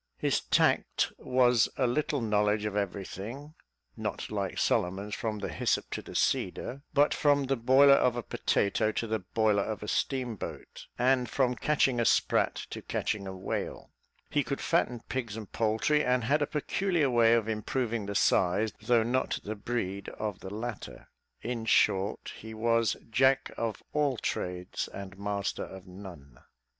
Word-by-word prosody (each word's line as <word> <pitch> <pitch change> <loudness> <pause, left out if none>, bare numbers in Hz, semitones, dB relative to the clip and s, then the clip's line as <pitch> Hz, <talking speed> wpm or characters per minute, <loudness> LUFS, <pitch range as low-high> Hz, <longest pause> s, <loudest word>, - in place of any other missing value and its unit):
His - - +1
tact - - +2
was 125 -3 +3
a 130 - +2
little 140 +2 0
knowledge 105 -1 +1
of 105 -1 -3
everything 105 - -4 0.4
(not - - -4
like - - -2
Solomon's, 95 +4 0
from 110 -1 -2
the 100 - -4
hyssop - - -1
to - - -3
the - - -11
cedar), 135 +2 0
but 145 +1 +4
from 145 -2 +3
the 135 0 0
boiler 130 +4 +6
of 125 -3 +3
a 120 - -3
potato 110 +2 +1
to - - -1
the 110 0 -1
boiler 105 +1 +1
of 110 +1 -4
a - - -6
steam 125 -1 -1
boat, - - -8
and 125 -1 +2
from 125 -1 +1
catching 135 -2 +1
a 120 - +2
sprat - - +2 0.2
to - - -5
catching 100 -2 -2
a 95 0 -6
whale; 95 - -4 0.4
he - - +1
could - - -3
fatten 120 -1 0
pigs 115 -5 -3
and 110 -3 -8
poultry, 110 +7 +1
and 125 -1 +2
had 145 +6 +2
a 145 - +1
peculiar 160 -1 0
way 115 -1 +5
of 115 -2 0
improving 110 0 -2
the 100 - -4
size, 100 +3 +2
though 120 -2 +3
not 125 +3 0
the 105 - -4
breed 100 -3 -3
of 105 -3 -3
the 95 - -8
latter; 110 +2 -6 0.3
in 120 -1 -3
short, 100 -2 +2
he 110 0 -9
was 115 0 +2
"jack 130 +3 +3
of 115 -3 -3
all 145 -4 +1
trades 90 -3 -3
and 95 -1 -8
master 100 0 -2
of 95 -1 -10
none." 90 -9 -12
115 Hz, 165 wpm, -29 LUFS, 100-125 Hz, 0.4 s, boiler